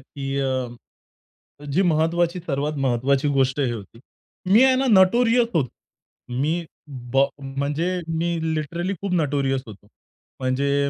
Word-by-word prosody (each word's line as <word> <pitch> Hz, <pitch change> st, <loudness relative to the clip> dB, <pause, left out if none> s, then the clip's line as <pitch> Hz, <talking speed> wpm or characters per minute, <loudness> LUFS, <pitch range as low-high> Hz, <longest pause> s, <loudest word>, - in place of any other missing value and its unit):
की 135 Hz, -1 st, -3 dB
अ, 130 Hz, +2 st, -7 dB
जी 180 Hz, +7 st, +2 dB
महत्त्वाची 170 Hz, +1 st, +1 dB
सर्वात 145 Hz, +1 st, -1 dB
महत्त्वाची 130 Hz, +3 st, +1 dB
गोष्ट 130 Hz, +1 st, +1 dB
ही 125 Hz, -3 st, +1 dB
होती. 115 Hz, 0 st, -8 dB, 0.5 s
मी 220 Hz, +6 st, +7 dB
आहे 260 Hz, -1 st, +5 dB
ना 265 Hz, +1 st, +1 dB
नोटोरियस 230 Hz, +4 st, +4 dB
होतो. 140 Hz, -7 st, +1 dB, 0.7 s
मी 165 Hz, +4 st, 0 dB, 0.5 s
बॉ 135 Hz, +1 st, +5 dB
म्हणजे 140 Hz, +5 st, -2 dB, 0.3 s
मी 170 Hz, +1 st, 0 dB, 0.2 s
लिटरली 170 Hz, +5 st, -2 dB
खूप 200 Hz, -2 st, -2 dB
नोटोरियस 140 Hz, -5 st, 0 dB
होतो. 105 Hz, -1 st, -13 dB, 0.5 s
म्हणजे 140 Hz, +2 st, +1 dB
145 Hz, 125 wpm, -23 LUFS, 135-175 Hz, 0.7 s, मी